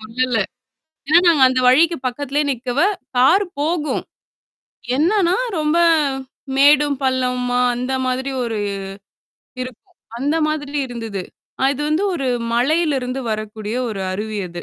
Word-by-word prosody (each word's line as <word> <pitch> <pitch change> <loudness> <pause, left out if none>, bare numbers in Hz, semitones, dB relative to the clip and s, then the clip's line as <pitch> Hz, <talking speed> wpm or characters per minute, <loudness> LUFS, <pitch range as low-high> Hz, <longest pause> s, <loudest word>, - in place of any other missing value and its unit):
சொல்லல. 240 +3 -1 0.7
ஏன்னா 320 +3 +7
நாங்க 315 -6 +5
அந்த 255 - 0
வழிக்கு 320 +7 +5
பக்கத்திலயே 285 +3 -1
நிக்கவே 260 +7 0 0.3
கார் 365 +11 +5
போகும்! 305 +1 -1 0.9
என்னான்னா 355 +4 +2 0.2
ரொம்ப 305 +2 +1 0.8
மேடும், 290 +1 +5
பள்ளமுமா 250 -1 0 0.2
அந்த 250 +2 -3
மாதிரி 260 +2 -1
ஒரு 230 -2 -3 1.1
இருக்கும். 255 -2 -9 0.3
அந்த 290 +5 0
மாதிரி 295 -1 -3
இருந்தது. 225 -5 -5 0.4
அ - - +3
இது 290 - -4
வந்து 310 +5 +1
ஒரு 275 -6 -2 0.3
மலையிலிருந்து 270 -1 +1
வரக்கூடிய 215 +1 -4
ஒரு 210 -3 -5
அருவி 210 +2 -4
அது. 175 0 -8
260 Hz, 120 wpm, -20 LUFS, 245-300 Hz, 1.1 s, ஏன்னா